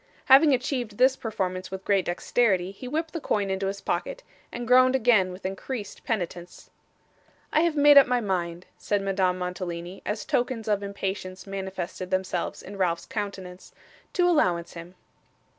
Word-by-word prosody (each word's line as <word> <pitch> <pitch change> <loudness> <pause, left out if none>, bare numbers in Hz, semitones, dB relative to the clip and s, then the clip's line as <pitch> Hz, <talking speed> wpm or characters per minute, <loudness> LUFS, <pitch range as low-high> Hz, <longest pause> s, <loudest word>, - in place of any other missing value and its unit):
Having 280 +3 +7
achieved 245 -4 -3
this 260 +1 +5
performance 185 -6 -3
with 190 0 -7
great 195 -3 +2
dexterity, 185 0 +1
he 225 +6 -9
whipped 315 +4 -3
the 330 - -4
coin 200 -6 0
into 190 0 -1
his 195 0 -4
pocket, - - -3 0.3
and 240 -1 -5
groaned 255 +1 +6
again 220 -7 +3
with 180 +1 -11
increased 205 +3 -5
penitence. 175 -5 -5 0.8
'I - - +4
have 335 -2 +1
made 290 -1 +8
up 275 - +4
my 250 0 +2
mind,' 180 -4 -3
said 205 -1 -1
Madame 190 -2 +1
Mantalini, 180 0 -5
as 210 +1 -3
tokens 240 -2 -1
of 205 -1 +1
impatience 195 -2 -5
manifested 190 -2 -5
themselves 185 -2 -2
in 200 +1 -9
Ralph's 170 -3 0
countenance, 190 -4 -6 0.4
'to 355 -1 +3
allowance 180 - +1
him. 170 +2 -10
195 Hz, 160 wpm, -26 LUFS, 185-245 Hz, 0.8 s, made